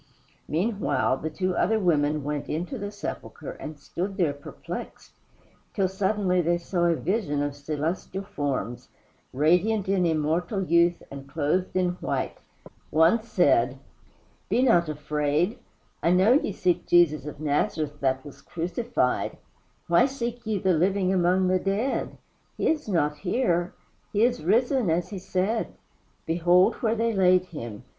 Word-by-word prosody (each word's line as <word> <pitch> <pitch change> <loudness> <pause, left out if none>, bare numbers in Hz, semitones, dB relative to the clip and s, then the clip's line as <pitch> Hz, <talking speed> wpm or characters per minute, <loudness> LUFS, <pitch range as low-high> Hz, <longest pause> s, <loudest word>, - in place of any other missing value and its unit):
Meanwhile, 195 - 0
the 160 - -4
two 185 +3 -2
other 220 +4 +2
women 150 -5 +1
went 145 0 -3
into 175 - -3
the 205 0 -4
sepulchre - - -7
and 155 -1 -8
stood 185 +7 -5
there 165 -7 +2
perplexed, 145 0 -8 0.6
till 195 -2 +2
suddenly 190 -1 +1
they 175 +1 +1
saw 175 0 -1
a 170 -1 +3
vision 160 -5 -1
of 145 -1 -3
celestial 155 +6 -3
forms, 135 - -4 0.4
radiant 180 +9 +2
in 190 -2 +2
immortal 165 +5 0
youth 170 0 +3
and 140 0 -9
clothed 160 +6 -1
in 185 -1 +2
white. - - -2 0.5
One 165 +9 +4
said: 135 - +2 0.7
"Be 250 - +2
not 175 -10 +4
afraid. 150 - -1 0.4
I - - +2
know 185 +6 +5
ye 270 -6 +2
seek 180 -2 0
Jesus 155 -4 +4
of 150 - -8
Nazareth 150 0 -1
that 130 0 0
was 140 -1 -12
crucified. 175 - -2 0.5
Why 170 +8 +4
seek 240 -3 -5
ye 215 -2 0
the 190 -1 +2
living 185 +3 +2
among 185 +1 +2
the 185 0 +2
dead? 200 +8 -1 0.4
He - - +1
is 310 -8 -1
not 150 -5 +1
here. 175 - 0 0.4
He 210 +1 +2
is 245 -4 +1
risen 240 - +2
as 170 +2 0
he 200 - -6
said. 190 +4 -1 0.5
Behold 175 +2 +4
where 225 -1 0
they 230 0 0
laid 185 -2 +4
him. 115 - -8
175 Hz, 145 wpm, -26 LUFS, 150-195 Hz, 0.7 s, know